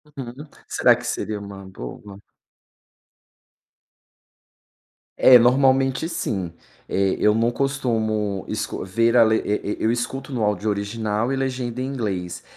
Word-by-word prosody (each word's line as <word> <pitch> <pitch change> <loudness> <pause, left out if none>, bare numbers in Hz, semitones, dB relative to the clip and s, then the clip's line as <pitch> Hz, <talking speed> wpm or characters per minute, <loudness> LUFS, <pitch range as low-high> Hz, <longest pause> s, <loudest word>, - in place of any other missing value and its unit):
Uhum, 135 +2 -8 0.2
será - - +4
que - - -10
seria 105 -1 -3
uma 100 -1 -9
boa? 95 +4 -9 3.0
É, 125 -1 +8
normalmente 135 +4 +3
sim. 95 - -3 0.4
Eh 95 0 +1
eu 105 - +4
não 115 +2 +2
costumo 110 -7 -1
escu - - -3
ver 115 +5 +1
a 115 - +8
le 110 0 +3
e 105 0 -2
e - - -4
eu 110 - +3
escuto 135 +4 -4
no 120 -3 -1
áudio 105 +1 0
original 105 +3 -2
e - - 0
legenda 125 -2 -3
em - - -1
inglês, 95 -9 -4
115 Hz, 135 wpm, -22 LUFS, 100-130 Hz, 3.0 s, É